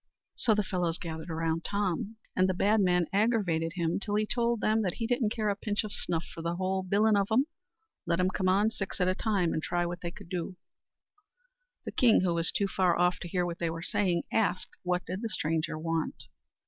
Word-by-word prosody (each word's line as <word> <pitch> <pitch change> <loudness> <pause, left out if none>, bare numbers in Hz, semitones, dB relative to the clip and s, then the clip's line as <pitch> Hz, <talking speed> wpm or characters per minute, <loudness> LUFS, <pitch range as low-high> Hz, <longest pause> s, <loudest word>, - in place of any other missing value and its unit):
So 220 -3 +2
the 210 - +1
fellows 180 -3 -1
gathered 160 -1 -6
round 165 0 -1
Tom, 200 +1 -1 0.2
and 185 0 +3
the 185 - 0
bad 210 +4 +3
man 180 -2 +3
aggravated 195 -7 +1
him 170 -1 0
till 205 0 -2
he 215 0 +2
told 235 +1 +1
them 215 +1 +2
he 230 - -3
didn't 240 -2 +1
care 215 -1 -1
a 200 - +1
pinch 205 +1 -1
o' - - -5
snuff 170 -4 -2
for 165 - -7
the 170 +1 -2
whole 190 +1 0
bilin' 205 +3 +3
of 200 -1 +2
'em; 255 +5 +4 0.6
let 170 - +1
'em 185 +1 +2
come 185 0 0
on, 205 +4 +3
six 200 -3 -5
at 180 - +2
a 185 - +3
time, 195 -4 0
and 155 - -1
try 175 +2 0
what 175 +1 -4
they 175 - -3
could 170 - -12
do. 180 0 -3 1.3
The - - -4
king, 235 -4 +5
who 180 -2 +1
was 170 0 +1
too 200 - +1
far 185 -2 +2
off 175 -1 +2
to - - -6
hear 180 +1 0
what 170 -1 -4
they 170 - 0
were 165 +1 -5
saying, 180 -3 +1
asked 210 -4 +1
what 180 0 -1
did 185 +3 -4
the 230 - -2
stranger 160 -4 -1
want. 165 0 -2
185 Hz, 225 wpm, -30 LUFS, 170-210 Hz, 1.3 s, king